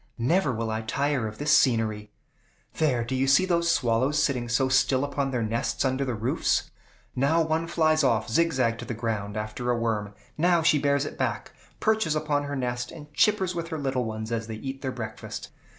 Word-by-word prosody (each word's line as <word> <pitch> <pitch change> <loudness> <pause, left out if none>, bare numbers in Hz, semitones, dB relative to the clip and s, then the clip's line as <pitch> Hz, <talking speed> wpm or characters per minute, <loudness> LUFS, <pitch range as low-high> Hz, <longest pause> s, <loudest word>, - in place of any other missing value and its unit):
"Never 145 +6 +2
will 115 -1 -2
I 110 0 -2
tire 140 +1 -1
of 105 0 -8
this 150 +1 0
scenery. 110 -4 +1 0.7
There; 130 -7 +2
do 120 - -4
you 130 +1 +1
see 140 +7 +5
those 170 -2 +1
swallows 130 -1 +2
sitting 125 -5 0
so 130 +3 +2
still 130 0 +3
upon 140 -1 -1
their 125 -3 -1
nests 115 +4 -1
under 130 +1 0
the 125 -3 -2
roofs? 115 +4 0 0.4
Now 145 +6 +3
one 160 +1 -1
flies 155 -2 +2
off 115 -4 +2
zigzag 125 -4 +1
to - - -6
the 120 - -4
ground, 110 -3 -3
after 110 +3 -4
a 120 - +2
worm; 105 -3 -2 0.2
now 170 0 +3
she 155 -2 +4
bears 140 0 +1
it - - -7
back, - - -2 0.3
perches 220 -8 +1
upon 150 -2 0
her 145 0 -4
nest, 125 -2 -2
and 150 -2 -12
chippers 190 +1 +2
with 170 -1 -4
her 160 -1 -4
little 135 -4 -1
ones 110 0 -5
as 115 -1 -2
they 110 - -5
eat 135 +4 -6
their 130 -1 -2
breakfast. 110 -3 -7
130 Hz, 200 wpm, -26 LUFS, 115-150 Hz, 0.7 s, see